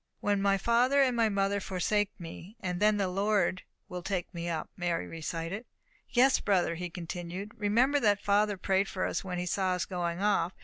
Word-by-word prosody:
"When 205 -1 +1
my 200 0 +3
father 245 +6 +3
and 255 -2 +1
my 230 -2 +3
mother 200 0 +1
forsake 195 +2 0
me, 170 +4 -9
then 205 +2 +1
the 195 -2 +1
Lord 195 0 +1 0.3
will 180 0 -6
take 180 0 -3
me 170 0 -4
up," 160 -2 -3
Mary 175 -2 -1
recited. 165 +6 -5 0.4
"Yes, 260 +2 +4
brother," 185 -4 +1
he 175 +1 -5
continued, 175 +3 -6
"remember 240 +7 +2
that 205 -5 +3
father 205 0 +2
prayed 195 +1 +1
for 185 - -2
us, - - -2
when 180 -2 -4
he 180 - -2
saw 185 +1 0
us 180 0 -1
going 175 -2 -3
off. 200 -3 +1
195 Hz, 185 wpm, -30 LUFS, 180-210 Hz, 0.4 s, Yes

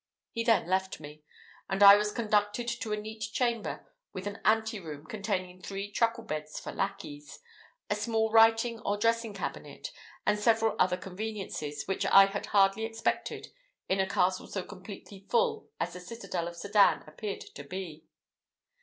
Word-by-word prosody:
He 230 - -2
then 225 -7 +3
left 190 +1 0
me, 150 +1 -11 0.5
and 195 +1 +2
I 200 0 +12
was 210 0 +1
conducted 210 +1 0
to 235 -2 -3
a 210 - 0
neat 220 +1 -7
chamber 235 0 -2 0.3
with 185 - -6
an 205 0 -5
anteroom, 210 -9 0
containing 185 -1 -3
three 200 +1 -5
truckle 230 +2 +1
beds 155 -6 -5
for - - -6
lackeys, 195 -7 -5 0.5
a - - +1
small 220 +1 0
writing 225 +1 +5
or 205 -1 -1
dressing 230 0 +1
cabinet, - - -6 0.3
and 210 0 +2
several 225 +1 +3
other 180 0 +3
conveniences, 190 -7 -5
which 195 - -1
I 195 0 +8
had 195 +1 -4
hardly 195 +1 +3
expected 225 0 -2 0.4
in 190 - +1
a 190 0 +1
castle 185 -1 +1
so 190 - -4
completely 195 0 -11
full 465 -2 +1
as - - -2
the 180 - -7
citadel 180 -3 -5
of 170 - -7
Sedan 200 +3 +3
appeared 195 +7 -6
to 140 - -8
be. 165 -1 -7
205 Hz, 160 wpm, -30 LUFS, 185-225 Hz, 0.5 s, I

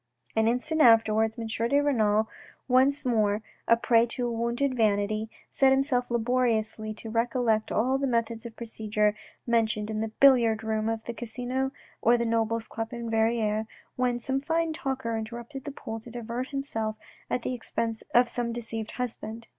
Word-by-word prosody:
An 220 0 +3
instant 280 +7 0
afterwards 225 -2 +5
M. 230 - -4
de 230 +5 +1
Renal, 220 -7 +2 0.4
once 265 +3 +3
more 215 -3 +1 0.2
a 230 - +5
prey 230 0 +3
to 245 +1 -2
wounded 235 +4 -1
vanity, 215 -1 +1 0.2
set 270 -1 +4
himself 265 -2 +2
laboriously 230 -2 0
to 220 +1 -7
recollect 230 -1 +1
all 260 +5 +1
the 275 - 0
methods 230 -2 -1
of 235 -2 -9
procedure 215 -2 0 0.3
mentioned 220 -2 +1
in 215 0 -2
the 220 - -1
billiard 230 -2 +4
room 220 0 -1
of 225 0 -3
the 235 - -5
Casino 250 +3 -3 0.3
or 235 +2 +5
the 235 - -1
Nobles' 225 0 0
Club 225 0 -5
in 235 -1 -5
Verrieres, 220 -1 +1 0.3
when 250 -1 +1
some 265 +3 -1
fine 325 +2 0
talker 265 -6 -3
interrupted 235 +4 -6
the 290 - -4
pool 225 -4 -6
to 225 - -12
divert 240 +2 -4
himself 225 -6 -2 0.3
at 245 - -1
the - - -2
expense 230 -2 -2
of 245 0 +6
some 235 0 -1
deceived 225 -2 -5
husband. 230 -2 -4
230 Hz, 165 wpm, -27 LUFS, 220-250 Hz, 0.4 s, of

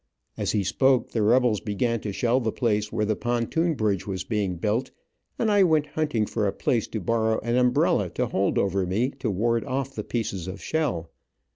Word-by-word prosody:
As - - -2
he 105 -2 +1
spoke 130 +6 +2
the 115 - 0
rebels 115 0 +3
began 115 +3 -1
to 105 - -4
shell 120 +5 +1
the 115 -3 -1
place 105 -3 0
where 105 -1 0
the 110 0 0
pontoon 120 +9 0
bridge 105 -6 -1
was 95 -2 -3
being 100 -5 -1
built, 110 +8 -1 0.5
and 220 -2 +1
I 205 -1 +5
went 160 -5 +4
hunting 150 -9 0
for 105 -1 -1
a - - +1
place 115 -4 0
to 110 - -4
borrow 110 +3 +1
an 120 +1 -1
umbrella 125 0 +2
to - - +1
hold 95 - 0
over 95 -1 +1
me, 115 +9 0
to 125 - -1
ward 115 +4 +1
off 135 0 -3
the - - -4
pieces 100 -7 -3
of 95 +2 -6
shell. 115 - -2
115 Hz, 205 wpm, -25 LUFS, 105-125 Hz, 0.5 s, I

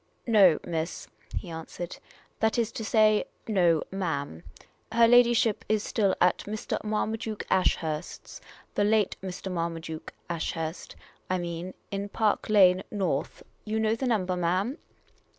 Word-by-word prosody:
" - - -35
No, 195 -8 +6
miss," 165 0 -3 0.3
he 175 - -6
answered. 165 +2 -7 0.2
" - - -32
That 220 +1 +2
is 230 -1 +1
to 225 - -5
say 215 -1 +4
— - - -39
no, 175 -7 +3
ma'am. 160 - -3 0.5
Her 230 +1 +5
ladyship 240 -2 +4
is 215 -1 +2
still 200 -4 +1
at 180 0 +3
Mr. 215 +1 -3
Marmaduke 215 0 -2
Ashurst's 165 -3 -1 0.2
— - - -26
the 205 - +1
late 210 -1 +2
Mr. 190 0 -5
Marmaduke 165 -2 -4 0.2
Ashurst, 165 -1 -4 0.3
I 185 - +1
mean 175 +1 -5
— - - -41
in 200 0 -3
Park 215 0 0
Lane 185 -3 +6
North. 185 -9 -2 0.2
You 220 0 -2
know 220 0 +2
the 260 +3 -2
number, 190 -6 +1
ma'am 185 - 0
190 Hz, 150 wpm, -28 LUFS, 170-215 Hz, 0.5 s, No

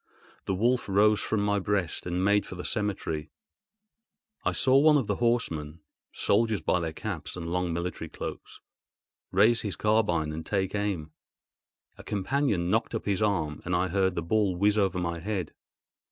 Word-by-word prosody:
The 95 - -1
wolf 120 +3 +1
rose 105 +2 +4
from 110 - -1
my 105 0 +1
breast 95 -4 -1
and 90 +2 0
made 105 0 +4
for - - -9
the 90 - -7
cemetery. 90 -8 -2 1.1
I - - +1
saw 130 0 +3
one 150 +1 +6
of 135 - 0
the 100 -1 -1
horsemen 85 -10 -1 0.3
(soldiers 110 0 +1
by 90 - +1
their 80 -2 -2
caps 85 -1 -5
and 90 -2 -6
their 85 - -4
long 90 -1 0
military 85 -1 -4
cloaks) - - -7 0.7
raise 110 +5 +4
his 100 -5 -3
carbine 95 -8 +1
and 80 +1 -5
take 95 0 -1
aim. 100 -7 -2 0.9
A - - -9
companion 105 -4 0
knocked 115 +2 0
up 115 - -4
his 100 0 0
arm, 85 -8 0
and 90 0 -1
I 90 +1 +1
heard 95 0 +1
the 85 - -2
ball 100 +1 +1
whizz 100 +3 +3
over 95 -3 +1
my 85 -1 -2
head. 95 -3 -3
95 Hz, 175 wpm, -28 LUFS, 85-105 Hz, 1.1 s, one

